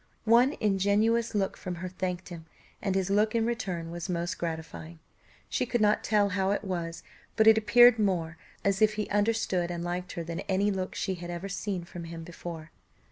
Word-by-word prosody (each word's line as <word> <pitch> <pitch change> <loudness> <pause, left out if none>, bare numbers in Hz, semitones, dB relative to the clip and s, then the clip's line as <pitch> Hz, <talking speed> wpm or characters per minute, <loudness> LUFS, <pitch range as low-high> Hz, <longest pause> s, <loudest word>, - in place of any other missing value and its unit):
One 240 +5 +5
ingenuous 215 +3 +2
look 195 -2 0
from 180 -1 -5
her 180 +2 -5
thanked 180 0 -4
him, 165 -2 -9 0.4
and 195 -2 -1
his 190 0 0
look 215 +2 +2
in 225 -1 +2
return 185 -8 -3
was 175 +2 -5
most 175 +1 -2
gratifying; 160 0 -5 0.5
she - - -1
could 240 - 0
not 210 0 +3
tell 205 -2 +2
how 190 0 0
it 205 +2 0
was, 170 -4 -4 0.3
but 220 - +4
it 220 0 +8
appeared 230 +2 +6
more 170 -6 0 0.3
as 200 0 +1
if 215 0 +4
he 210 -1 -2
understood 205 -4 +1
and 170 -1 -4
liked 175 +1 -4
her 170 - -4
than 170 0 -5
any 200 +2 +2
look 190 -1 -3
she 190 - -1
had 175 -1 -7
ever 175 +3 -5
seen 195 -2 -3
from 170 0 -8
him 165 0 -7
before. 165 -1 -8
190 Hz, 195 wpm, -28 LUFS, 175-210 Hz, 0.5 s, it